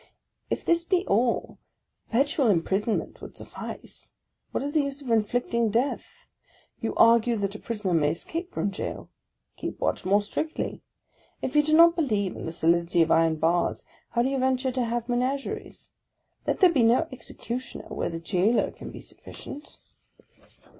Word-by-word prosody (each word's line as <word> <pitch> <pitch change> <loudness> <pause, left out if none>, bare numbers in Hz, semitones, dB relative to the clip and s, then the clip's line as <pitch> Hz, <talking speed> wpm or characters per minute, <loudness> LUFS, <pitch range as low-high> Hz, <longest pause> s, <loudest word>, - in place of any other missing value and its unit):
If - - -2
this 335 0 +3
be 370 +1 +1
all, 235 +4 +1 0.5
perpetual 275 +2 +2
imprisonment 200 +3 0
would - - -10
suffice. - - -8 0.4
What - - -2
is 285 +1 -3
che 310 - +4
use 280 0 -4
of 265 -5 -5
inflicting 230 +1 +1
death? 240 +6 -2 0.5
You - - -3
argue 230 +1 +5
that 200 -1 -2
a 210 - -8
prisoner 210 -5 -2
may 150 -3 +3
escape 330 - -4
from 200 - -1
gaol, 195 - -5 0.2
— - - -50
keep - - -5
watch - - -1
more 200 +3 +3
strictly! 310 +9 -3 0.6
If 260 - -3
you 300 - +7
do 310 +1 +2
not 335 0 +8
believe 210 - 0
in - - -6
the - - -3
solidity 170 +1 +3
of 165 - -1
iron. 165 -1 +4
bars, 165 +3 +1 0.2
how 235 - +1
do 260 - +1
you 270 -1 -1
venture 260 0 +1
to 250 -1 0
have 235 0 -2
menageries? 255 +3 -2 0.6
Let - - 0
there 365 -2 +7
be 270 - +3
no 235 +8 +4
executioner 255 0 -6
where - - -2
the 165 - -4
jailer 185 +7 +1
can - - -9
be - - -9
sufficient. 290 +2 -10
235 Hz, 165 wpm, -26 LUFS, 195-275 Hz, 0.6 s, not